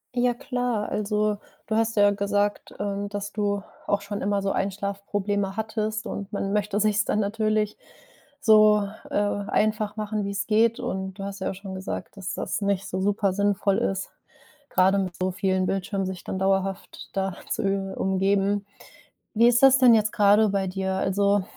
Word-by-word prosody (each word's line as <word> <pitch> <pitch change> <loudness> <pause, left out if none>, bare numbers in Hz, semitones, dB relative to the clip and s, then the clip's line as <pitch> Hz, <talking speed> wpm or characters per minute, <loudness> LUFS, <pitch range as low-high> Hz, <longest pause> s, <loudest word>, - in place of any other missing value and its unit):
Ja, 245 0 +2
klar. 245 -3 -2
Also, 210 0 0 0.3
du 220 - -1
hast 225 +1 +1
ja 205 -1 +5
gesagt, 205 0 -1
ähm, 200 0 -2
dass 205 0 -5
du 205 -1 -1 0.3
auch 205 0 +1
schon 200 0 -5
immer 200 0 0
so 195 0 0
Einschlaf-Probleme 200 0 -2
hattest 220 0 -2
und 200 -2 -6
man 195 -1 -2
möchte 210 0 0
sich's 210 0 +2
dann 210 - +1
natürlich 215 0 0 0.6
so, 215 -2 +5 0.2
äh, - - -5
einfach 205 +1 0
machen, 215 -1 -2
wie's 200 0 -3
geht. 225 +1 +3
Und, 190 0 -3
du 195 - -8
hast 200 0 -6
ja 190 - -2
auch - - -5
schon 195 -1 -8
gesagt, 190 +2 -6
dass 190 -2 -5
das - - -3
nicht 200 -2 -1
so 185 - -2
super 200 0 +1
sinnvoll 200 0 +1
ist, 195 0 -1 0.6
grade 190 +2 +3
mit 185 -3 -2
so 185 0 -1
vielen 185 0 0
Bildschirmen 195 +1 -1
sich 185 -1 -5
dann 190 - -3
dauerhaft 195 0 -1
da 190 -1 -1
zu - - -1
über 195 -1 -1
umgeben. 195 +1 +1 0.7
Wie 230 +2 +5
ist 240 +2 +4
das 270 0 +8
denn 250 -3 +7
jetzt 215 -1 +3
grade 210 +1 +5
bei 195 -1 0
dir? 190 +1 -2
Also, 200 +1 +2
200 Hz, 175 wpm, -25 LUFS, 195-215 Hz, 0.7 s, das